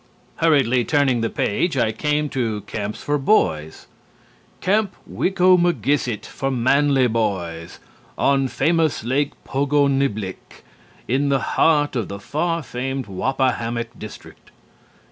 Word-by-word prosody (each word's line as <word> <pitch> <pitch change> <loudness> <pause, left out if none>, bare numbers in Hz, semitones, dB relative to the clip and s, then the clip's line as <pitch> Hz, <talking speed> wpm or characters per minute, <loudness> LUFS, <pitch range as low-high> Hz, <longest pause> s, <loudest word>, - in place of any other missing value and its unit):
Hurriedly 135 -7 +3
turning 140 -5 +2
the 115 - 0
page, 155 - -1
I 115 -3 +2
came 150 +6 0
to 115 -6 -2
Camps 105 +1 -5
for 145 0 0
Boys. 80 - +1 0.7
"'Camp 205 +1 +1
Wicomagisset, 175 - +2
for 135 - -3
Manly 135 +2 +3
Boys. 95 -8 -2 0.4
On 135 -1 +2
famous 160 +3 +1
Lake 135 +5 0
Pogoniblick 135 -8 -1 0.4
in 140 +3 +1
the 140 - +3 0.2
heart 145 -3 +3
of 115 -6 -1
the 100 - -7
far 165 +8 -2
famed 130 +1 -4
Wappahammock 120 +2 -1
district. 110 - -11
135 Hz, 110 wpm, -21 LUFS, 115-145 Hz, 0.7 s, Hurriedly